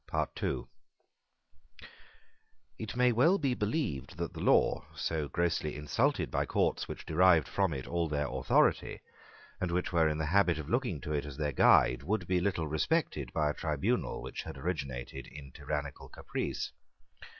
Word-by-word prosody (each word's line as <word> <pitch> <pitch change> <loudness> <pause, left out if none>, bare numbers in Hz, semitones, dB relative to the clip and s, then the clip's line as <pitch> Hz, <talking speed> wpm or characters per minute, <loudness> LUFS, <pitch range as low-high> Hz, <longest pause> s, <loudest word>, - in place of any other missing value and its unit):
It 110 0 -5
may 125 0 +4
well 150 - +4
be 140 -8 0
believed, 105 - -2
that - - -3
the - - -8
law, - - +3
so 80 -3 -2
grossly 85 -2 -1
insulted 75 -1 0
by - - 0
courts - - 0
which - - -7
derived 85 -2 +4
from 95 -3 +1
it 65 -4 -4
all 85 -1 -1
their 75 -1 0
authority, 65 0 +2 0.6
and 90 - -1
which 90 +1 -1
were 80 -2 +4
in 75 - -1
the 80 - -1
habit 90 +1 +3
of 80 -2 -6
looking 120 - 0
to 75 - -4
it 75 - 0
as 70 -2 -8
their 75 -1 -1
guide, - - +5
would 105 +9 -1
be 90 -1 +1
little 90 -4 0
respected 75 - 0
by 75 -2 +1
a - - -5
tribunal 75 -2 -1
which - - -5
had - - -8
originated 65 -5 -4
in 70 0 -11
tyrannical 70 +1 -5
caprice. - - -4
80 Hz, 160 wpm, -31 LUFS, 70-95 Hz, 0.6 s, guide